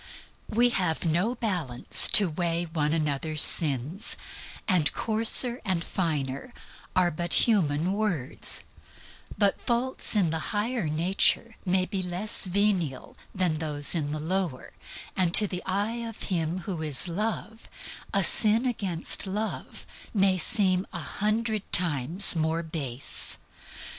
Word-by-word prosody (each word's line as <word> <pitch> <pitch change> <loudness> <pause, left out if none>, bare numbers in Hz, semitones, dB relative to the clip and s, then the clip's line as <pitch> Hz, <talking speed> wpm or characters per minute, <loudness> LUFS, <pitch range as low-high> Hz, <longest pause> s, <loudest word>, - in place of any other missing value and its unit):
We 240 +3 +2
have 180 -8 -2
no 175 +9 -1
balance 175 - +4
to 205 - +7
weigh 170 +1 -3
one 155 -3 -3
another's 155 -1 -2
sins, 150 - 0 0.5
and 165 -7 +1
coarser 230 +2 +3
and 185 -5 -2
finer 150 - -4 0.4
are 180 -1 +2
but 170 +3 +3
human 175 -5 0
words; 185 - 0 0.7
but 200 -2 0
faults 240 0 -1
in 185 -6 +1
the 160 - -3 0.2
higher 230 -1 -2
nature 180 +8 0
may 185 0 +1
be 195 0 -5
less 185 +4 0
venal 185 -7 -2 0.2
than 180 -5 -1
those 150 -2 +2
in 150 -4 -2
the 155 - -5
lower, 170 -4 -4 0.4
and 180 -2 0
to 215 - +8
the 185 -2 -6
eye 205 +5 -2
of 225 - -10
Him 170 +1 -3
who 175 -2 -6
is 155 +2 +2
Love, 220 +4 -5 0.4
a 200 -2 +1
sin 220 +6 +3
against 195 -7 -1
Love 210 +3 -6 0.3
may 195 -2 +2
seem 185 +1 +2
a 175 - -5
hundred 215 +5 -3
times 170 +2 +5
more 160 +1 -2
base. 140 -6 -3
180 Hz, 130 wpm, -25 LUFS, 160-210 Hz, 0.7 s, to